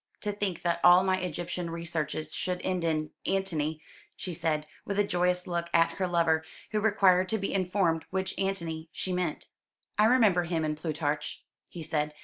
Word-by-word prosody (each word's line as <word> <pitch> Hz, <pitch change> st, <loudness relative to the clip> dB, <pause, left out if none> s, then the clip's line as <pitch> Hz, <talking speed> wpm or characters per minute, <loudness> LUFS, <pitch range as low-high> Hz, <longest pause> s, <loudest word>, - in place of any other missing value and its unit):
"To 210 Hz, -, -1 dB
think 200 Hz, -4 st, -3 dB
that 170 Hz, -1 st, +1 dB
all 180 Hz, +1 st, +8 dB
my 190 Hz, 0 st, +2 dB
Egyptian 175 Hz, 0 st, -3 dB
researches 160 Hz, -2 st, -3 dB
should 180 Hz, -1 st, -1 dB
end 185 Hz, -2 st, -1 dB
in 155 Hz, -2 st, 0 dB, 0.2 s
Antony!" 160 Hz, -5 st, -1 dB, 0.3 s
she 180 Hz, -, -5 dB
said, 160 Hz, -2 st, -1 dB, 0.2 s
with 200 Hz, -, -3 dB
a 205 Hz, -, +5 dB
joyous 180 Hz, -1 st, +1 dB
look 170 Hz, -1 st, -2 dB
at 165 Hz, 0 st, +5 dB
her 185 Hz, -, +1 dB
lover, 165 Hz, -2 st, +2 dB, 0.3 s
who 215 Hz, -, +1 dB
required 190 Hz, -4 st, +4 dB
to 220 Hz, -, +1 dB
be 195 Hz, -1 st, -3 dB
informed 180 Hz, -3 st, +1 dB
which 190 Hz, 0 st, -2 dB
Antony 170 Hz, -5 st, -2 dB
she 185 Hz, -, -3 dB
meant. 180 Hz, -4 st, -2 dB, 0.5 s
"I 210 Hz, -, +7 dB
remember 215 Hz, -7 st, +4 dB
him 165 Hz, -2 st, -1 dB
in 150 Hz, 0 st, -1 dB
Plutarch," 150 Hz, -1 st, -3 dB, 0.3 s
he 170 Hz, -, -7 dB
said. 150 Hz, -1 st, -1 dB
175 Hz, 175 wpm, -29 LUFS, 160-190 Hz, 0.5 s, all